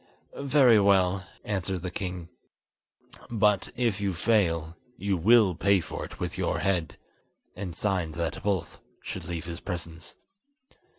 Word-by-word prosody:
"Very 135 -5 +5
well," 95 -2 +3 0.2
answered 95 -3 -2
the 90 - -3
king; 90 -3 -4 1.0
"but 105 -4 +2
if 115 -5 0
you 100 -3 -1
fail, 85 -5 +1 0.2
you 100 0 0
will 105 +2 +5
pay 100 +3 +3
for - - -6
it - - -9
with - - -4
your - - 0
head!" 90 -4 -1 0.6
and 95 -4 -6
signed 90 -5 -1
that 85 -1 -3
both 100 -4 -2 0.2
should - - -6
leave 85 -2 -4
his 85 0 -6
presence. 85 -3 -7
95 Hz, 135 wpm, -27 LUFS, 85-105 Hz, 1.0 s, Very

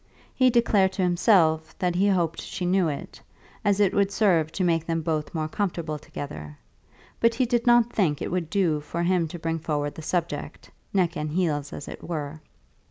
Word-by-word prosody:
He 255 -1 +4
declared 215 -6 +3
to 190 - -1
himself 175 -3 +3
that 180 -1 0
he 190 +3 +2
hoped 175 -5 +1
she 185 - -5
knew 180 -1 +2
it, 145 -2 -6 0.4
as 205 -1 +2
it 200 -2 +3
would 200 -1 +2
serve 175 -7 +2
to 190 - -1
make 165 -2 +2
them 165 -1 -1
both 155 0 -2
more 155 -1 -1
comfortable 165 -4 -3
together; 75 - -8 0.6
but 230 0 +3
he 255 +1 +2
did 240 0 0
not 240 -1 +5
think 165 -8 +1
that - - -4
it - - -5
would 175 -3 -2
do 175 -6 +1
for 170 +3 -4
him 175 -1 +2
to 165 - -7
bring 165 0 -2
forward 145 -2 -2
the - - -9
subject, 170 +1 -3 0.2
neck 185 -4 +1
and 150 0 -3
heels 150 -5 0
as 140 - -7
it - - -9
were. 155 -2 -5
175 Hz, 200 wpm, -25 LUFS, 155-195 Hz, 0.6 s, not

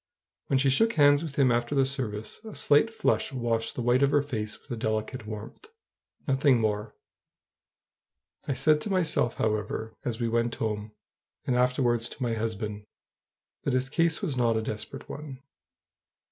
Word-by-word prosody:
When 135 - +2
she 135 0 +3
shook 225 - +3
hands 145 -1 +5
with 155 -4 -6
him 135 -3 +4
after 120 +4 0
the 135 -1 +4
service, 115 - -5
a 220 -2 -9
slight 150 +10 +4
flush 225 - 0
washed 115 -3 -1
the 125 - -3
white 120 +2 +3
of 140 - +4
her 145 0 +3
face 110 -7 -4
with - - -17
a - - -1
delicate 110 +1 -3
warmth, 110 - -8 0.6
nothing 135 -2 +4
more. 105 -1 -1 1.5
I 140 - 0
said 150 +4 +3
to 210 - -4
myself, 165 - +2
however, 110 +1 -2
as 120 -1 -3
we 120 - 0
went 115 +1 0
home, 105 -1 -3 0.5
and 125 - +1
afterwards 125 -2 +2
to 135 - -6
my 120 -2 0
husband, 110 -2 -3 0.8
that 140 - 0
his 130 +1 -1
case 165 +4 +2
was 155 -9 -1
not 120 -3 +2
a 110 - -1
desperate 110 +6 -6
one. 140 -3 -8
125 Hz, 170 wpm, -28 LUFS, 110-140 Hz, 1.5 s, hands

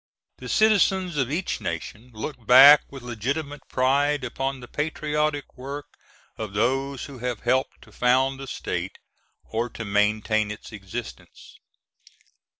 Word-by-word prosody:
The - - -8
citizens 190 -5 +3
of 135 -2 0
each 175 +5 -2
nation 105 +8 -5
look 115 +1 -7
back 140 +4 +10
with 135 -3 -10
legitimate 140 +6 -4
pride 140 +2 +2
upon 135 +2 -3
the 120 - -11
patriotic 150 -1 -2
work 140 +3 -6 0.5
of 110 -3 -5
those 135 +5 0
who 135 -3 -10
have 125 -2 -3
helped 130 +2 0
to - - -18
found 130 +2 +2
the 135 - -7
state, - - -4 0.5
or 115 +2 -3
to 115 - -7
maintain 105 +1 +1
its 105 +3 -8
existence. 105 +2 -9
130 Hz, 135 wpm, -25 LUFS, 115-145 Hz, 0.5 s, back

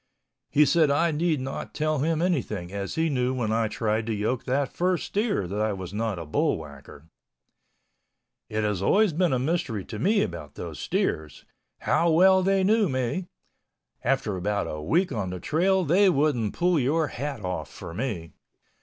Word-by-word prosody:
He 150 +1 +5
said 155 +1 +3
I 160 +4 +2
need 160 0 0
not 135 +1 -6
tell 155 -1 0
him 160 +3 +1
anything 110 - -1
as 100 -1 -4
he 160 0 +1
knew 130 -3 0
when 115 -4 -1
I 110 0 +1
tried 110 +1 -1
to 115 - 0
yoke 110 +4 -1
that 135 +1 0
first 180 0 0
steer 205 - 0
that 100 +4 -3
I 110 -1 +1
was 95 -1 -7
not 110 -2 -2
a 85 - -6
bullwhacker. 70 -2 -3 1.5
It 110 0 -1
has 105 -3 -1
always 200 - +3
been 175 +2 +2
a 130 - +2
mystery 130 - -1
to 110 - -7
me 205 - +3
about 85 -7 -6
those - - -7
steers—how 80 - -2
well 190 +3 +5
they 195 +1 +2
knew 210 -1 +3
me—after 130 - -4
about 100 +3 -1
a 75 - -5
week 170 - +1
on 105 -7 -2
the 90 0 -5
trail 185 - +1
they 190 +6 +5
wouldn't 140 - +1
pull 175 -2 +2
your 150 +4 +1
hat 135 -6 -5
off 90 0 -3
for 85 - -9
me. 90 - -4
130 Hz, 170 wpm, -26 LUFS, 105-165 Hz, 1.5 s, He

